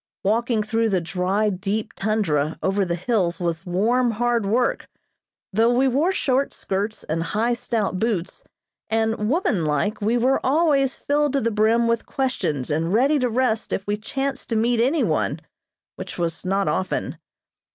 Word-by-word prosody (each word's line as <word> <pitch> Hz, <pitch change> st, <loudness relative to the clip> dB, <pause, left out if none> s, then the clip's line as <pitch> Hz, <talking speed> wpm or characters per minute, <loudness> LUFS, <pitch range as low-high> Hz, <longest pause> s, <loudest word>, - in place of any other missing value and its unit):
Walking 225 Hz, +2 st, +1 dB
through 225 Hz, +1 st, 0 dB
the 190 Hz, -3 st, +2 dB
dry, 190 Hz, +5 st, 0 dB
deep 205 Hz, +3 st, -3 dB
tundra 165 Hz, -8 st, 0 dB
over 195 Hz, +1 st, +1 dB
the 175 Hz, -2 st, -1 dB
hills 180 Hz, -2 st, 0 dB
was 170 Hz, 0 st, -3 dB
warm, 235 Hz, +8 st, +2 dB
hard 235 Hz, -1 st, 0 dB
work, 240 Hz, +4 st, 0 dB, 0.6 s
though 225 Hz, +4 st, +4 dB
we 255 Hz, +2 st, +3 dB
wore 285 Hz, +8 st, +2 dB
short 275 Hz, -7 st, 0 dB
skirts 205 Hz, +3 st, -3 dB
and 165 Hz, +2 st, -2 dB
high, 215 Hz, +9 st, 0 dB
stout 220 Hz, -5 st, -2 dB
boots, 195 Hz, -5 st, -2 dB, 0.5 s
and 220 Hz, -1 st, 0 dB
womanlike, 205 Hz, -, 0 dB
we 225 Hz, +4 st, +2 dB
were 255 Hz, +3 st, +2 dB
always 275 Hz, -2 st, +2 dB
filled 290 Hz, -1 st, 0 dB
to 275 Hz, -, +1 dB
the 230 Hz, -, 0 dB
brim 225 Hz, +2 st, +3 dB
with 230 Hz, 0 st, 0 dB
questions 155 Hz, -, -2 dB
and 160 Hz, +3 st, 0 dB
ready 275 Hz, +6 st, +3 dB
to 250 Hz, -1 st, +1 dB
rest 230 Hz, -2 st, 0 dB
if 195 Hz, -, -2 dB
we 205 Hz, -, 0 dB
chanced 270 Hz, +5 st, -4 dB
to 230 Hz, -, 0 dB
meet 230 Hz, +1 st, +2 dB
any 280 Hz, +6 st, +2 dB
one, -, -, 0 dB, 0.6 s
which -, -, -7 dB
was 170 Hz, -2 st, -2 dB
not 195 Hz, +1 st, 0 dB
often. 185 Hz, -, -2 dB
220 Hz, 160 wpm, -23 LUFS, 190-245 Hz, 0.6 s, though